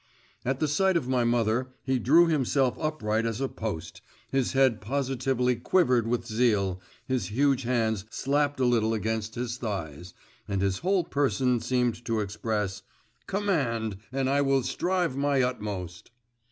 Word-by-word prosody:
At 130 +1 -1
the 155 - +1
sight 190 +5 +2
of 145 - -3
my 130 -2 +2
mother, 120 +1 +1 0.2
he 130 -1 0
drew 155 +9 +6
himself 135 -4 +1
upright 115 -8 -1
as 115 0 -2
a 135 - 0
post, 105 -10 -6 0.3
his 135 -2 0
head 130 -4 +3
positively 130 +1 0
quivered 125 -4 +2
with 120 0 -1
zeal, 105 -5 +1 0.2
his 130 -8 -1
huge 135 +6 +2
hands 110 -5 0
slapped 145 +3 0
a 130 - +3
little 115 -2 +2
against 110 0 -2
his 120 0 -3
thighs, 90 - -5 0.3
and 100 -2 -1
his 95 -1 0
whole 185 +1 +1
person 135 -5 +1
seemed 125 -1 0
to 115 -2 0
express: 105 -1 -2 0.5
'Command!… 130 - -1
and 135 0 0
I 140 +1 +2
will 135 -2 +2
strive 175 -1 0
my 140 -1 +2
utmost! 100 -8 -4
125 Hz, 155 wpm, -27 LUFS, 110-135 Hz, 0.5 s, drew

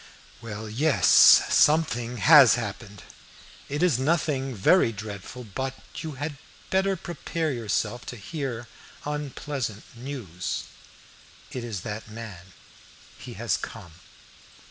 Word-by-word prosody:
"Well, 110 -1 -7
yes, 140 +8 +1 0.4
something 125 -6 +3
has 140 0 +8
happened. 105 -3 -6 0.7
It 145 +4 -1
is 160 -9 +3
nothing 135 -3 0
very 115 - +4
dreadful, 105 +3 -8
but 130 +5 -4 0.2
you 160 -2 -5
had 145 +2 -5 0.3
better 195 +1 +2
prepare 165 -2 -3
yourself 120 0 -2
to 125 - -6
hear 120 - -5 0.4
unpleasant 145 -6 -4
news." 115 - -5 0.9
"It 125 - -5
is 110 -6 -5
that 110 +2 -6
man 105 -5 -9 0.7
he - - -9
has - - 0
come." 85 - -9
125 Hz, 110 wpm, -26 LUFS, 110-150 Hz, 0.9 s, has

